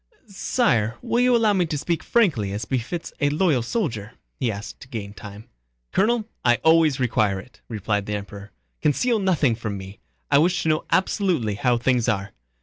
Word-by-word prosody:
"Sire, 150 - 0
will 235 - 0
you 250 0 +4
allow 220 -3 +3
me 180 -3 +1
to 150 - -2
speak 165 +3 -1
frankly 150 - +2
as 105 +2 -4
befits 130 +8 -3
a 145 - +3
loyal 150 -3 +2
soldier?" 115 - -3 0.3
he 120 -3 +1
asked 105 +2 -8
to - - -12
gain 105 -5 -6
time. 105 +1 -11 0.4
"Colonel, 225 +1 +1 0.2
I 120 -1 +5
always 160 -3 +4
require 110 -6 +1
it," 125 +6 -15
replied 105 -2 -2
the 105 - -2
Emperor. 100 0 -8 0.3
"Conceal 225 - +2
nothing 170 - +2
from 110 -3 -4
me, 95 +1 -10 0.3
I - - +6
wish 180 +4 +2
to 160 - 0
know 155 0 +1
absolutely 185 - +1
how 120 +4 +1
things 120 0 +1
are." 100 -3 -1
125 Hz, 180 wpm, -23 LUFS, 105-180 Hz, 0.4 s, I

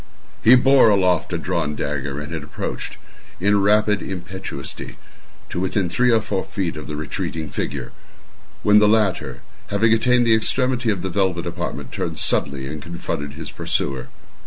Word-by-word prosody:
He 115 +4 +8
bore 130 -1 +6
aloft 95 -3 +2
a 85 - 0
drawn 75 -1 -2
dagger, 70 -1 -3
and 75 +2 -6
had 80 - -3
approached, 75 - -5 0.4
in 100 +2 +3
rapid 105 +1 +3
impetuosity, 90 -5 -6 0.5
to - - -2
within 95 0 0
three 125 +8 +2
or 115 -1 +4
four 95 -4 -2
feet 95 -2 -3
of 75 -1 -7
the 75 - -4
retreating 80 +1 -4
figure, - - -4 0.7
when 105 0 +6
the 105 0 +5
latter, 105 -4 +1 0.3
having 110 +2 +3
attained 125 +2 +3
the 115 - +5
extremity 125 +2 +1
of 100 -4 -1
the 95 - -2
velvet 95 -2 0
apartment, 85 +1 -5
turned - - -3
suddenly 70 -1 +2
and 75 +2 -6
confronted 75 -3 -5
his 80 +1 -7
pursuer. 65 -2 -2
95 Hz, 160 wpm, -21 LUFS, 80-105 Hz, 0.7 s, He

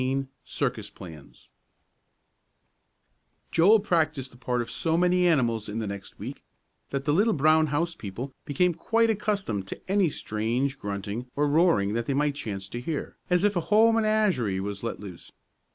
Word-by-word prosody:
XIX 135 +1 0 0.2
CIRCUS - - -3
PLANS 80 -6 -13 2.0
Joel 200 +7 +6
practised 155 - 0
the - - -16
part 125 -1 -1
of - - -10
so 165 0 0
many 180 0 +3
animals 115 -9 +1
in 105 - -4
the 110 - -2
next 100 -1 -7
week - - -7 0.5
that 140 0 -3
the 145 - +2
little 210 +6 +3
brown 155 +2 +4
house 165 +4 0
people 120 - -7
became 175 +5 +1
quite 225 +7 +2
accustomed 200 - -2
to - - -7
any 195 -2 +3
strange 120 +4 -2
grunting 100 +4 -4
or 145 +1 +2
roaring 145 - +3
they 115 +4 -1
might 145 +1 +1
chance 100 -8 -5
to 120 - -5
hear, 150 +3 -4
as 180 0 +3
if 205 -1 +2
a - - +2
whole 220 +2 +6
menagerie 210 - +1
were 100 +2 -3
let 115 - -4
loose. 95 -5 -10
140 Hz, 165 wpm, -27 LUFS, 110-180 Hz, 2.0 s, Joel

